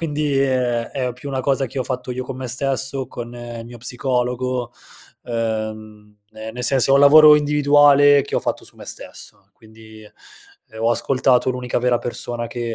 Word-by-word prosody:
quindi, 150 -3 -1
ehm, 125 -3 0
è 130 -3 -2
più 125 +4 -10
una 135 -1 -2
cosa 135 0 0
che 135 +3 -7
ho 130 - -1
fatto 125 0 -5
io 130 +1 -4
con 125 - -7
me 130 -1 -6
stesso, 130 +1 -2
con 120 0 -8
il 120 -1 -8
mio 120 +1 -11
psicologo, 125 0 -2 0.5
ehm, 110 -2 -5 0.2
ehm, 110 0 -8
nel 125 +1 -4
senso 135 +1 +2
è - - +6
un 140 - +5
lavoro 150 +1 +8
individuale 145 -1 +4
che 140 - -7
ho - - +1
fatto - - -3
su - - -15
me - - -11
stesso. 100 - -8
Quindi, 110 0 -16
ehm, 105 - -16 0.7
ho 115 - +2
ascoltato 130 +2 +1
l'unica 125 -1 -2
vera 120 0 +1
persona 120 0 -5
che 120 -1 -4
125 Hz, 185 wpm, -20 LUFS, 120-135 Hz, 0.7 s, lavoro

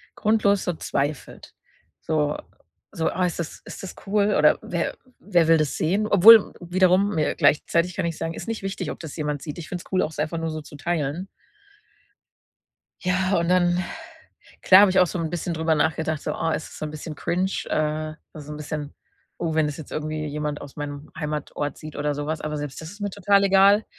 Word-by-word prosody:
grundlos 210 -2 +2
so 180 - -1
zweifelt. 145 -2 -4 0.5
So 150 -2 0 0.5
so: 160 - -1
„Ah, 185 0 0
ist 175 -2 -3
das 170 - -5
ist - - -9
das 195 - -7
cool? 205 +1 +2
Oder - - +5
wer - - -2 0.2
wer 175 -5 +2
will 165 0 +6
das 155 -3 -1
sehen?“ 195 +7 +1
Obwohl 215 +2 +8
wiederum 185 +3 +2
mir- 155 -2 0
gleichzeitig 170 +3 +2
kann 190 - -1
ich 165 -2 -3
sagen- 165 - -3
ist - - -8
nicht 225 -3 -4
wichtig, 195 0 -3
ob - - -8
das 160 -4 -8
jemand 150 -3 -3
sieht. 150 -1 -7
Ich 160 - -8
find's 175 -1 -5
cool, 185 - +2
auch - - -1
es 155 - -10
einfach 155 +2 -1
nur 165 0 -2
so 155 0 -5
zu 145 - -13
teilen. 160 +2 -2 1.8
Ja, 185 +1 +1
und 170 0 0
dann, 175 -1 +3 0.8
klar, 190 +1 +8
habe 205 -1 +6
ich 190 - +2
auch 180 - +5
so 180 - -4
'n 165 -1 -1
bisschen 175 +1 -3
drüber 160 0 +1
nachgedacht, 160 0 0
so: - - -2
„Oh, - - -1
ist 160 - -3
das - - -12
so 155 - -3
'n - - -6
bisschen 155 +1 -7
cringe?“, 180 +5 -1 0.2
äh, 155 0 -1 0.2
also 150 -3 -10
so 150 - -7
'n - - -6
bisschen: 150 -1 -5 0.4
„Oh, 165 -2 -2
wenn 155 -1 +3
das 150 -1 -4
jetzt 155 - -10
irgendwie 155 0 -3
jemand 150 0 -3
aus 145 - -11
meinem 145 0 -6
Heimatort 150 -2 -3
sieht“ 155 -1 -10
oder 145 0 -1
so 145 +1 -4
was, 155 0 -2
aber 150 0 -3
selbst 145 -2 -5
das 160 0 -8
ist 205 +2 -11
mir 205 - -1
total 200 +1 +3
egal. 200 +2 +5
160 Hz, 215 wpm, -24 LUFS, 150-185 Hz, 1.8 s, Obwohl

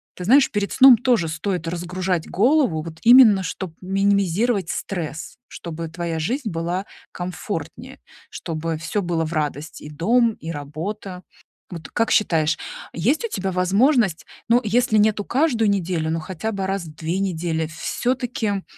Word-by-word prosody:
ты 180 - -7
знаешь, 265 +8 +5
перед 205 -1 -2
сном 260 -2 +8
тоже 240 -7 +1
стоит 165 +2 -3
разгружать 180 0 -2
голову, 240 - +2
вот 160 0 -9
именно 230 -5 +7
чтоб 180 0 -5
минимизировать 195 +1 +1
стресс, 165 -5 -5
чтобы 165 -1 -6
твоя 165 0 -4
жизнь 235 - -2
была 175 +2 -3 0.3
комфортнее, 180 0 -6 0.3
чтобы 165 -1 -4
всё 170 +6 -2
было 170 -2 -1
в 155 - -5
радость: 150 0 -3
и 150 - -9
дом, 225 +9 +2
и 165 - -9
работа. 175 +6 -6 0.5
Вот 165 -2 -8
как 230 -1 0
считаешь, 160 -6 +2 0.4
есть 250 - 0
у - - -4
тебя 190 - -3
возможность, 195 - +2 0.2
ну, 240 +1 +5
если 220 +1 +2
нету 210 -1 +2
каждую 245 -5 +1
неделю, 175 -5 -1
но 165 - -1
хотя 185 +6 -4
бы 195 -2 -3
раз 195 -1 -2
в 155 - -11
2 165 +4 -3
недели, 165 -4 -1
всё-таки 220 +4 -2
185 Hz, 150 wpm, -22 LUFS, 165-220 Hz, 0.5 s, сном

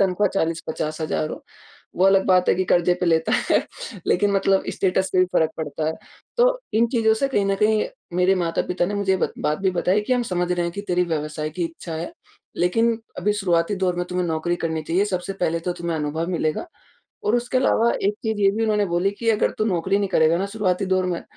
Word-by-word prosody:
तनख़्वाह 195 +1 +2
40-50,000 160 -2 -2
हो। - - -7 0.5
वो 185 - +3
अलग 195 0 +4
बात 185 -1 +4
है - - +5
कि 185 +1 0
कर्ज़े 175 0 +3
पे 180 - +1
लेता 160 -1 +2 0.2
है, - - +2 0.4
लेकिन 205 +3 +2
मतलब 195 0 +2
स्टेटस 190 0 0
पे 185 - +2
भी 185 - +6
फ़र्क 160 -1 +2
पड़ता 155 0 -3
है। 160 - +1 0.4
तो - - +3
इन 230 +2 +4
चीज़ों 220 -2 +3
से 275 +5 0
कहीं 205 -7 +1
न 195 - +2
कहीं 215 0 +3 0.3
मेरे 180 +1 +4
माता-पिता 175 0 -1
ने 205 - -3
मुझे 200 -1 +1
ये - - +3
बत - - -1
बात 150 0 -1
भी 190 -1 +1
बताई 180 +3 +1
कि, 210 +5 -2
"हम 250 - +2
समझ 180 -5 -2
रहे 175 -1 0
हैं 170 - -3
कि 200 - -5
तेरी 180 0 +2
व्यवसाय 155 -1 -3
की 170 +3 -3
इच्छा 165 0 -6
है, 165 +2 -5 0.4
लेकिन 225 +6 +2 0.2
अभी 205 +3 +1
शुरुआती 180 -2 +1
दौर 185 -2 0
में 175 - -1
तुम्हें 180 -1 -1
नौकरी 165 +2 -1
करनी 160 -2 -2
चाहिए 175 +6 +1
सबसे 185 -1 -3
पहले 170 -1 0
तो 180 +2 -2
तुम्हें 170 -1 -2
अनुभव 155 +3 -2
मिलेगा।" 160 - -1 0.6
और 220 - +3
उसके 245 +2 0
अलावा 235 -2 +3
एक 200 +2 +1
चीज़ 220 -1 -1
ये 195 - +5
भी 225 +2 -1
उन्होंने 210 -2 +2
बोली 175 +2 +1
कि, 230 +3 -4
"अगर 215 - +2
तू 215 - +1
नौकरी 195 -1 +1
नहीं 200 - -1
करेगा 160 -3 +3
ना 195 - -1
शुरुआती 195 -2 0
दौर 185 0 +1
में, 175 -2 -2
180 Hz, 225 wpm, -23 LUFS, 170-205 Hz, 0.6 s, भी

